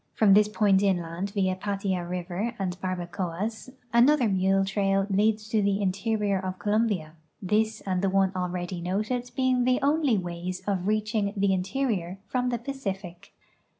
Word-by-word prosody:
From 210 -3 +5
this 210 +1 +6
point 205 -2 +3
in 195 -2 +3
land 170 +3 -4
via 190 -2 0
Patia 195 -2 -2
river 180 +6 -3
and 185 -3 -2
Barbacoas 185 +4 -3 0.2
another 250 +2 +5
mule 195 0 +2
trail 195 0 +1
leads 215 +2 +2
to 220 -2 +2
the 200 0 +1
interior 200 +1 0
of 185 0 -4
Colombia, 205 -7 0 0.3
this 215 +3 0
and 185 -2 -1
the 195 - +2
one 195 0 +2
already 180 -1 -3
noted 215 +8 -2
being 255 -1 +2
the 255 0 +2
only 285 -5 +3
ways 180 +1 -4
of 190 -2 -1
reaching 215 -1 0
the 195 -1 +2
interior 190 -2 -1
from 250 +4 -1
the 240 - 0
Pacific. 195 -8 -6
195 Hz, 155 wpm, -27 LUFS, 185-220 Hz, 0.3 s, this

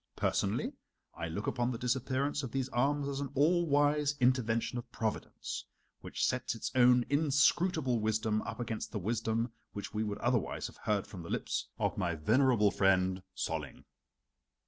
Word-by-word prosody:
Personally - - 0 0.4
I 85 - -4
look 100 +6 -4
upon 120 -1 0
the 125 - -3
disappearance 130 +4 0
of 130 -5 -5
these 135 0 -1
arms 140 +3 +1
as 140 -1 -3
an 140 -1 -3
all 170 +5 +3
wise 145 0 +3
intervention 120 -1 +1
of 120 - -11
Providence, 110 -1 -4 0.3
which - - -2
sets 125 -1 -1
its 115 - -4
own 125 -1 +5
inscrutable 145 -1 +2
wisdom 110 0 0
up 110 - -6
against 115 -2 -4
the 110 - -3
wisdom 115 +3 -1 0.2
which 100 -1 -6
we 110 0 0
would 105 -1 -3
otherwise 120 0 0
have - - -8
heard 105 -2 0
from 95 - -9
the 85 - -9
lips - - -2
of - - -1
my 85 -2 0
venerable 110 - +3
friend 95 -1 +2 0.2
Solling." - - -4
120 Hz, 165 wpm, -32 LUFS, 110-140 Hz, 0.4 s, own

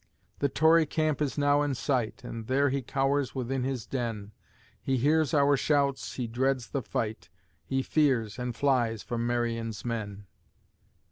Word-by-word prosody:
The 140 - +1
Tory 160 +2 +4
camp 155 -1 0
is 145 -1 -1
now 145 0 +3
in 145 -2 0
sight, 125 -3 -1
And 115 -2 -7
there 140 +2 +3
he 140 0 -1
cowers 135 +1 0
within 130 0 -2
his 130 -5 -3
den; 115 -6 -4 0.5
He 130 - 0
hears 150 +4 +2
our 145 -2 +4
shouts, 140 -1 0
he 125 - -2
dreads 125 +2 -1
the 140 - -2
fight, 110 -1 -4 0.3
He 135 0 -1
fears, 125 -9 +1
and 125 -1 -3
flies 120 -6 +1
from 120 -1 -2
Marion's 115 -2 -2
men. 105 -4 -4
130 Hz, 155 wpm, -28 LUFS, 115-140 Hz, 0.5 s, Tory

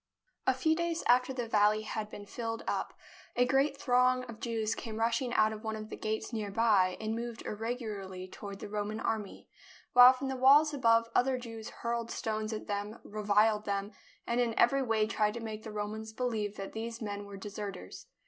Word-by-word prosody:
A 260 - +4
few 315 +5 +2
days 340 0 -1
after 250 +2 +4
the 245 -3 -3
valley 215 0 +3
had 215 -1 -4
been 205 -1 -9
filled 225 +2 -4
up, - - -2 0.4
a 245 - +4
great 270 +2 +2
throng 255 -1 +3
of 230 -3 -9
Jews 225 -2 -1
came 220 -2 -6
rushing 230 +2 +1
out 215 0 +4
of 215 +1 -9
one 220 0 -2
of 215 0 -7
the - - -4
gates 220 +2 -3
near 215 -2 -2
by 200 -4 +3
and 220 0 -2
moved 235 0 -5
irregularly 210 -5 -4
toward 200 +1 -8
the - - -5
Roman 210 +1 -3
army, 215 -3 -3 0.5
while 250 +1 +10
from 260 +1 -4
the 265 - -2
walls 285 +4 +6
above 230 -4 +4
other 260 +1 +3
Jews 225 -3 -7
hurled 235 0 -3
stones 215 -1 -2
at 215 - -5
them, 205 +2 -3
reviled 210 +1 +2
them, 200 0 -2 0.3
and 235 +1 +1
in 230 -2 -1
every 275 +3 +4
way 225 -4 +2
tried 215 0 0
to - - -4
make 220 -2 -6
the 220 - -8
Romans 215 +1 -5
believe 220 -4 -2
that 195 - -7
these 230 +1 -5
men 205 -2 -5
were 200 -1 -8
deserters. 200 - -7
220 Hz, 195 wpm, -31 LUFS, 210-245 Hz, 0.5 s, while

